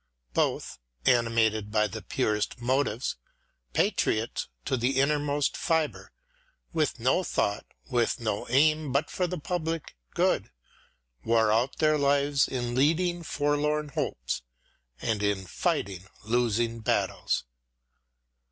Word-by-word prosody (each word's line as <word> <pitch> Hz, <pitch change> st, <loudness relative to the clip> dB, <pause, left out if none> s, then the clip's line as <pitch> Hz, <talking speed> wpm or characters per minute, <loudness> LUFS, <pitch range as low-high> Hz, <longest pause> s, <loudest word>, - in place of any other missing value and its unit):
Both, -, -, 0 dB, 0.3 s
animated 115 Hz, -3 st, +3 dB
by 105 Hz, 0 st, +2 dB
the 110 Hz, +1 st, -5 dB
purest 105 Hz, -1 st, -1 dB
motives, 125 Hz, -1 st, 0 dB, 0.6 s
patriots 110 Hz, +2 st, +1 dB, 0.2 s
to -, -, +1 dB
the 130 Hz, +2 st, +1 dB
innermost 145 Hz, 0 st, +1 dB
fibre, 160 Hz, -3 st, -1 dB, 0.6 s
with 155 Hz, -6 st, 0 dB
no 130 Hz, +10 st, +2 dB
thought, 100 Hz, -, -1 dB, 0.2 s
with 120 Hz, 0 st, +1 dB
no 110 Hz, -3 st, -2 dB
aim 155 Hz, +2 st, +3 dB
but 140 Hz, +4 st, 0 dB
for 180 Hz, -, 0 dB
the 180 Hz, +1 st, -3 dB
public 165 Hz, -, -3 dB, 0.2 s
good, -, -, +2 dB, 0.7 s
wore 110 Hz, -1 st, +3 dB
out 120 Hz, +5 st, +1 dB
their 155 Hz, -1 st, +3 dB
lives 140 Hz, 0 st, +3 dB
in 120 Hz, -2 st, -3 dB
leading 170 Hz, +6 st, +2 dB
forlorn 150 Hz, 0 st, 0 dB
hopes -, -, -2 dB, 0.6 s
and 110 Hz, -3 st, -1 dB
in 100 Hz, -2 st, 0 dB
fighting 95 Hz, +1 st, -2 dB, 0.2 s
losing 115 Hz, 0 st, +1 dB
battles. 110 Hz, -, 0 dB
130 Hz, 115 wpm, -28 LUFS, 110-150 Hz, 0.7 s, animated